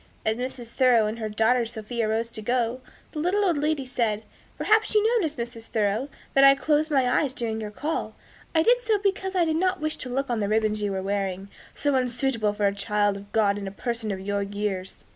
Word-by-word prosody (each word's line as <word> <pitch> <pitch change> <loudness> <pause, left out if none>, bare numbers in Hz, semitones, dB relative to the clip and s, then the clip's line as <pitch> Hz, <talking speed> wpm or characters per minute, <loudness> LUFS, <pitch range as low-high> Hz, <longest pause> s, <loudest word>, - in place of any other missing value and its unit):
As 220 - +2
Mrs. 250 -1 -5
Thoreau 240 -3 +4
and 215 +2 -3
her 220 -1 -3
daughter 225 +4 +2
Sophia 225 0 -3
rose 225 +2 -1
to 215 - -6
go, 240 +2 0 0.3
the 305 - -5
little 385 +6 +1
old 340 -6 +2
lady 300 -2 0
said, 230 -4 -1 0.3
"Perhaps 435 0 +2
you 445 +3 +4
noticed, 315 -4 -2
Mrs. 235 -1 -6
Thoreau, 215 +5 0 0.2
that 275 - +5
I 275 0 +8
closed 305 +2 +1
my 270 -4 +3
eyes 260 +2 +1
during 225 -4 -3
your 210 - -4
call. 300 +10 -3 0.4
I 320 - +5
did 485 +4 +5
so 445 -3 +1
because 385 -1 -1
I 350 -2 +3
did 320 -1 0
not 370 +2 +1
wish 310 0 -2
to 255 - -6
look 270 +1 -2
on 235 - 0
the 200 -1 -1
ribbons 215 -1 +1
you 205 -1 -1
are 190 - -3
wearing, 195 -1 -2 0.3
so 285 0 0
unsuitable 250 -3 +1
for 205 0 -1
a 200 - +3
child 205 0 +1
of 200 +1 -10
God 205 -2 +2
and 200 - -5
a - - -5
person 230 +1 -3
of 195 -2 -3
your 200 +1 -2
years." 200 -2 -4
235 Hz, 225 wpm, -25 LUFS, 210-290 Hz, 0.4 s, I